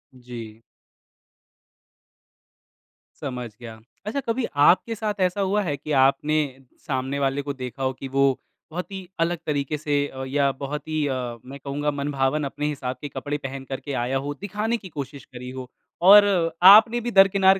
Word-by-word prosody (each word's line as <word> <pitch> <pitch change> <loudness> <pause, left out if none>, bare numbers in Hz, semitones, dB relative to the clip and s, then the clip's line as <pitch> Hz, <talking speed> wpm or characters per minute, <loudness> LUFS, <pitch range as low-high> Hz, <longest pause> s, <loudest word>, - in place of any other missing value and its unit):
जी। 115 -3 -10 2.6
समझ 125 -4 -4
गया। 115 -2 -10 0.3
अच्छा 220 +7 -2
कभी 235 0 -1 0.2
आपके 225 +5 +4
साथ 215 -1 -2
ऐसा 185 +2 +1
हुआ 195 +2 +1
है? 145 -5 -1
कि 150 +2 -7
आपने 140 +3 +2 0.5
सामने 135 0 -2
वाले 135 0 0
को 140 0 -4
देखा 130 0 -6
हो 130 0 0
कि 135 +1 -8
वो 135 0 +2 0.3
बहुत 180 +5 -5
ही 190 -2 -7
अलग 170 +1 +1
तरीके 145 0 -1
से 145 -1 0
अ, 130 -1 -7
या 140 0 +2
बहुत 140 +2 -6
ही 155 -1 0
अ, 125 -3 -3
मैं 140 +2 -9
कहूँगा 145 +2 -2
मनभावन 140 0 -1
अपने 145 +2 -3
हिसाब 130 -3 -4
के 145 - -5
कपड़े 145 +2 -4
पहन 135 -1 -6
कर 135 - -3
के 145 - -6
आया 130 +2 0
हो, 145 +2 -3
दिखाने 210 +4 -1
की 195 -4 -11
कोशिश 140 +1 -6
करी 125 0 -9
हो 130 -1 -8 0.4
और 205 +1 +10 0.5
आपने 225 +3 +7
भी 240 +1 -3
दरकिनार 195 -1 +5
145 Hz, 170 wpm, -24 LUFS, 135-180 Hz, 2.6 s, और